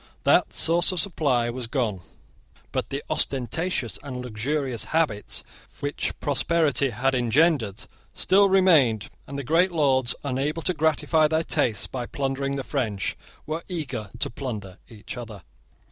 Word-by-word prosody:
That - - +4
source 170 +3 +2
of 185 - -1
supply 135 -9 +1
was 125 -1 -5
gone: 115 -8 -1 0.7
but - - -2
the - - -3
ostentatious 135 0 -1
and 130 -3 -6
luxurious 125 0 -2
habits 120 -7 -1 0.4
which 145 0 -3
prosperity 145 -1 +1
had 130 +3 0
engendered 125 - +2 0.3
still 200 +1 +4
remained; 155 - +4 0.2
and 140 - -6
the 140 - -3
great 170 +7 +3
lords, 130 -6 +2
unable 145 +4 -1
to 180 - +1
gratify 160 0 +3
their 160 +1 +1
tastes 110 -9 0
by 125 -2 -5
plundering 140 0 -2
the 135 - -3
French, 115 -9 -2 0.3
were 160 +2 -3
eager 135 - -4
to - - -1
plunder 110 -7 -6
each 110 +2 -9
other. 110 -6 -8
135 Hz, 140 wpm, -25 LUFS, 120-160 Hz, 0.7 s, That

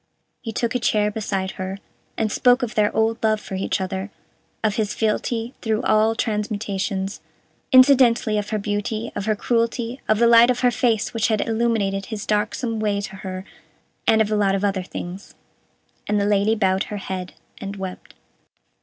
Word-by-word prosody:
He 225 - -5
took 230 +2 -1
a 250 - 0
chair 210 -3 +1
beside 195 -3 -2
her, 190 +1 -4 0.4
and 220 -1 0
spoke 250 +3 +3
of 240 -1 -2
their 210 -2 +2
old 225 +1 +1
love 215 -1 +2
for 195 - -9
each 190 +2 -1
other, 190 +1 -3 0.5
of 215 -2 +2
his 215 -2 -1
fealty 225 +2 -1
through 220 0 0
all 220 0 +3
transmutations; 205 -3 -2 0.5
incidentally 255 -5 +5
of 205 - -5
her 215 - 0
beauty, 210 +2 -3
of 200 - -3
her 215 - +2
cruelty, 235 +3 -1
of 215 - +4
the 235 - +4
light 235 +1 +7
of 250 - +1
her 250 -1 +4
face 225 -2 0
which 230 -2 +1
had 220 -1 0
illumined 220 -4 0
his 220 -2 -5
darksome 220 +2 -1
way 205 -2 0
to 200 -1 -7
her 185 0 -6 0.6
and 220 0 +5
of 215 - -5
a - - +2
lot 200 -2 +2
of 195 - -2
other 195 -2 +1
things 180 +1 -8 0.7
and 210 0 +1
the 200 - +1
Lady 205 +2 +2
bowed 190 -3 +1
her 210 - -5
head, 185 -2 -5 0.2
and 200 0 -6
wept. 190 -2 -8
215 Hz, 180 wpm, -22 LUFS, 200-230 Hz, 0.7 s, light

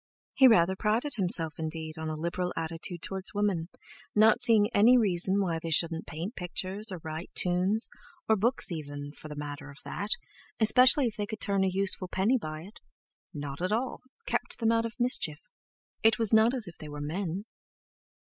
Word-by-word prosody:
He 265 - +6
rather 190 -5 +4
prided 225 +9 -1
himself 175 -5 +1
indeed 160 0 -5
on 160 0 -4
a 155 - -3
liberal 170 +3 -3
attitude 165 +1 -5
towards 190 +1 -3
women, 195 -5 -1 0.5
not 215 +1 +5
seeing 215 -3 +5
any 235 +5 +6
reason 190 -3 +2
why 170 -4 -1
they 165 - -6
shouldn't 165 +1 +2
paint 170 - -6
pictures, 190 +4 -2
or 185 - -6
write 160 +2 -6
tunes, 185 +5 +4 0.4
or 220 - +4
books 230 +1 +1
even, 145 -3 -6
for 155 - -12
the 150 - -8
matter 145 0 -7
of 140 - -13
that, 205 - -5 0.5
especially 250 +5 +6
if 230 - -3
they 205 -1 -3
could 215 0 -6
turn 200 -2 +1
a - - +2
useful 190 0 0
penny 205 +8 +1
by 155 -5 -6
it; 200 +4 -14 0.5
not 145 +1 -7
at 185 +2 -1
all—kept 255 - -3
them 225 -1 +1
out 230 0 +1
of 230 - -12
mischief. 240 -11 +1 0.6
It 220 -1 +4
was 225 -2 +1
not 220 +3 +5
as 235 -6 -4
if 170 - -10
they 155 - -9
were 145 0 -7
men! 175 +5 -4
190 Hz, 185 wpm, -28 LUFS, 160-220 Hz, 0.6 s, He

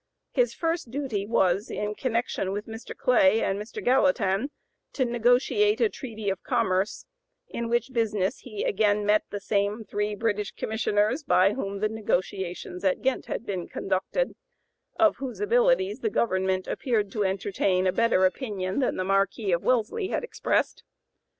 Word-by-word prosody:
His - - +1
first 330 -5 -2
duty 245 -7 -3
was, 195 -2 +2
in 210 0 -3
connection 230 -5 -1
with 205 +1 -3
Mr. 225 +1 -8
Clay 225 -4 +4
and 195 +1 0
Mr. 210 - -7
Gallatin, 255 -3 +2 0.4
to 260 - +1
negotiate 245 - +2
a 460 - +3
treaty 220 - -7
of 190 - -5
commerce, 205 -6 0 0.4
in 235 0 -4
which 240 +2 0
business 210 -5 0
he 215 -5 -6
again 205 0 +2
met 210 +1 +3
the 205 - -4
same 205 +2 0
three 210 0 -2
British 210 -1 -1
Commissioners 220 +4 0
by 195 -8 +4
whom 200 -5 -4
the 215 - +3
negotiations 185 -4 -3
at 190 -2 +1
Ghent 265 0 0
had - - -4
been 185 -5 -3
conducted, 195 - -1 0.7
of 330 -2 +4
whose 265 -2 -6
abilities 465 -2 +2
the 440 - 0
government 190 - 0
appeared 215 -6 -1
to 210 -1 -1
entertain 190 -1 0
a 185 - +3
better 230 -5 +3
opinion 190 -1 -2
than 260 - +1
the 185 - -1
Marquis 195 +1 +1
of 170 0 +2
Wellesley 255 - +1
had - - -2
expressed. 475 - -1
215 Hz, 155 wpm, -26 LUFS, 195-250 Hz, 0.7 s, Clay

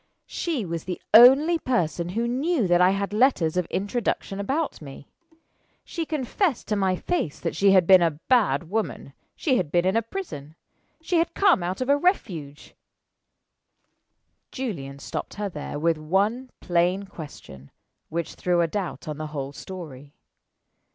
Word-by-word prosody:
She 305 - -3
was 170 -2 -5
the 180 -1 -4
only 275 +9 +7
person 175 - -1
who 230 +6 -1
knew 270 - 0
that 175 -1 +3
I 180 - +6
had 195 +1 -2
letters 210 - +2
of 180 -1 0
introduction 200 -1 -2
about 275 - -2
me. 140 -1 -11 0.8
She 330 -2 -5
confessed 305 - -1
to 210 - +1
my 190 -2 +1
face 185 - -2
that 165 - -3
she 195 -1 +4
had 185 -3 +5
been 185 0 +7
a 165 -4 +1
bad 230 -9 +2
woman 220 +5 -3 0.2
she 265 -7 +1
had 165 -8 -2
been 175 +1 +2
in 190 +3 +1
a 230 - +3
prison 210 - -7 0.5
she 345 +1 0
had 335 +1 0
come 395 - +4
out 180 +6 -3
of 255 - -1
a 285 - +5
refuge 175 - -2 1.3
" - - -51
Julian 165 - -5
stopped - - -6
her 205 -1 -3
there 150 -3 -6
with 160 +1 +1
one 205 +11 0
plain 180 +2 +1
question, 145 - -11 0.4
which 170 +1 -3
threw 175 -1 +1
a 170 - +2
doubt 185 0 -5
on 150 -1 -5
the 155 - -4
whole 140 -2 -5
story. 145 -5 -10
190 Hz, 165 wpm, -25 LUFS, 165-250 Hz, 1.3 s, only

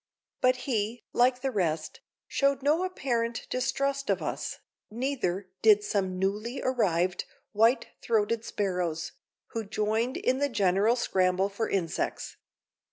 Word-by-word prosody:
But 255 0 +5
he, 225 -2 -1
like 250 +1 +3
the 270 0 -1
rest, 165 -7 -1 0.3
showed 275 -1 +1
no 305 +5 +3
apparent 240 -10 -1
distrust 275 +2 -1
of - - +2
us, - - -4 0.3
neither 215 -6 -2
did 210 -2 +6
some 190 -3 -1
newly 210 +7 -1
arrived 185 -8 +1 0.3
white 225 +4 +3
throated 225 0 +1
sparrows, 180 -6 -2 0.4
who 225 - -3
joined 220 +4 -1
in 260 +1 +1
the 285 0 +1
general 200 +1 +3
scramble 185 -4 +1
for 210 +3 -2
insects. 175 -4 -2
220 Hz, 125 wpm, -28 LUFS, 195-255 Hz, 0.4 s, did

